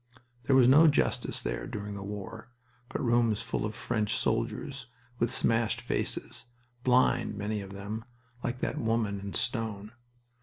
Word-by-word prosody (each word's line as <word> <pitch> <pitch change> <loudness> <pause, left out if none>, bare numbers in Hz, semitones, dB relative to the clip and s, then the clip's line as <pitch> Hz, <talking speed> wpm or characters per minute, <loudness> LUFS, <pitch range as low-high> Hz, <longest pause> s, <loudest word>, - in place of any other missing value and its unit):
There 135 - +4
was 130 -2 +7
no 150 +5 +8
justice 145 - +1
there - - -3
during 105 0 -5
the 100 - -6
war, 100 +3 -7 0.4
but - - -3
rooms 115 -3 +3
full - - -1
of 105 - -7
French 110 -2 0
soldiers 135 -3 -1 0.3
with 115 - +2
smashed 115 -2 +2
faces, 120 - -2 0.4
blind, 125 -4 +3
many 105 0 -2
of 95 -1 -9
them, 105 +3 -5 0.4
like 120 +1 -3
that - - -1
woman 110 -3 0
in 100 0 -6
stone. 110 -4 -2
110 Hz, 150 wpm, -30 LUFS, 105-120 Hz, 0.4 s, no